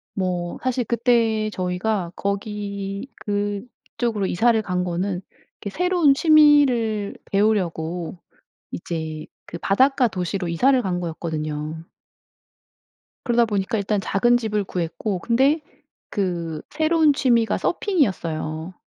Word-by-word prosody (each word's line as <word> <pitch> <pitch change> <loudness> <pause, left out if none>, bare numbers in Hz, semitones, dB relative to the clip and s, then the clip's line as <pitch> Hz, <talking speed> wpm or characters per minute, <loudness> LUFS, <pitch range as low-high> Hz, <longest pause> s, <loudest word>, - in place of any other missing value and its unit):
뭐 180 -2 -2
사실 255 -1 0
그때 230 -2 +2
저희가 180 0 -2
거기 200 +1 -4
그쪽으로 205 +1 -3
이사를 225 +5 +3
간 180 -2 -1
거는 180 +1 -2 0.4
이렇게 200 - -4
새로운 350 - +3
취미를 275 -9 +4 0.2
배우려고 180 -5 0 0.5
이제 160 -2 -5 0.2
그 170 - -7
바닷가 260 +7 +3
도시로 185 -2 -3
이사를 255 +11 +3
간 185 -5 -2
거였거든요. 160 -1 -4 1.4
그러다 240 -2 +3
보니까 205 0 -1
일단 200 0 0
작은 240 +6 +2
집을 215 -3 -1
구했고 180 +3 -3
근데 265 - +2 0.5
그 170 -5 -2
새로운 315 0 +3
취미가 235 -4 +2
서핑이었어요. 170 - -1
200 Hz, 255 characters per minute, -23 LUFS, 180-240 Hz, 1.4 s, 취미를